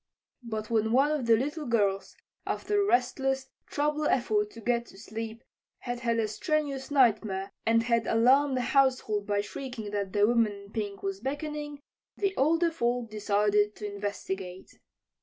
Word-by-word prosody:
But 220 -2 -5
when 220 0 +2
one 275 +4 +4
of 290 -6 -1
the 225 -1 +6
little 295 +4 -3
girls, 200 -4 0 0.3
after 415 0 0
a - - +2
restless, 265 0 +1 0.2
troubled 300 +1 0
effort 215 -4 +1
to 230 - -12
get 235 +1 0
to - - -15
sleep, 225 +2 -7 0.4
had 245 -1 -4
had 235 -1 0
a 225 -1 +1
strenuous 280 +3 -2
nightmare, 215 -8 +2 0.2
and 230 0 +4
had 235 -1 +1
alarmed 260 +4 +4
the - - +1
household 255 -7 +2
by 205 -1 +1
shrieking 225 -1 -6
that 200 -2 -2
the 205 0 +4
woman 230 -2 +3
in 200 0 -12
pink 205 -3 -4
was 195 0 -3
beckoning, 295 +3 -4 0.4
the 395 -1 0
older 330 +4 +3
folk 240 -6 -1
decided 210 0 +2
to 210 -1 -6
investigate. 190 -2 -5
230 Hz, 160 wpm, -29 LUFS, 210-270 Hz, 0.4 s, the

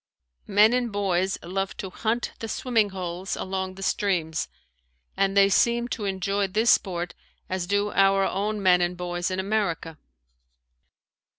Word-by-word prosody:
Men 210 +3 +5
and 245 -2 0
boys 190 -2 0
love 195 +2 -3
to 190 - -6
hunt 230 +5 -1
the 225 - -5
swimming 225 -3 +1
holes 185 0 -4
along 190 0 -4
the 195 - -8
streams 175 -6 0 0.7
and 195 0 +1
they 195 0 +7
seem 235 +4 +2
to 220 -4 -3
enjoy 195 +1 0
this 215 +4 +3
sport 175 -3 0 0.3
as 185 -1 -3
do 205 +2 +1
our 195 0 +4
own 205 +1 -2
men 180 -1 +5
and 175 0 -1
boys 175 0 -2
in 185 0 -2
America. 190 -6 -2
195 Hz, 150 wpm, -25 LUFS, 180-205 Hz, 0.7 s, they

